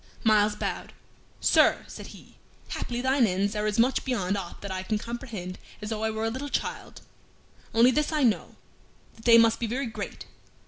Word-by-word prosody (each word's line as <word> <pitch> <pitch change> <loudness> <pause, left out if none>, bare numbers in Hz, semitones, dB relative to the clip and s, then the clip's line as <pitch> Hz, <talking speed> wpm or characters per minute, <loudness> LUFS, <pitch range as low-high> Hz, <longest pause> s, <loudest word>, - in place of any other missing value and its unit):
Myles 210 -2 +4
bowed. - - -4 0.5
"Sir," - - +4
said - - -9
he, - - -15 0.3
"haply 240 0 -3
thine 260 -2 +3
ends 195 +3 0
are 210 0 0
as 210 - -1
much 245 +3 +3
beyond 205 -7 -1
aught 185 -4 -6
that 200 - -6
I 185 0 -2
can 210 +3 -1
comprehend 220 -6 -6 0.2
as 210 +1 -6
though 220 0 -2
I 220 - +1
were 220 0 -2
a 225 - 0
little 270 +4 -5
child; - - -4 0.7
only 235 +3 +5
this 300 +4 0
I 305 -2 +1
know, 230 -4 +1 0.6
that 225 - -17
they 230 -1 +8
must 230 -1 +5
be 235 - -1
very 260 +5 -2
great. 225 - -6
225 Hz, 190 wpm, -27 LUFS, 210-245 Hz, 0.7 s, they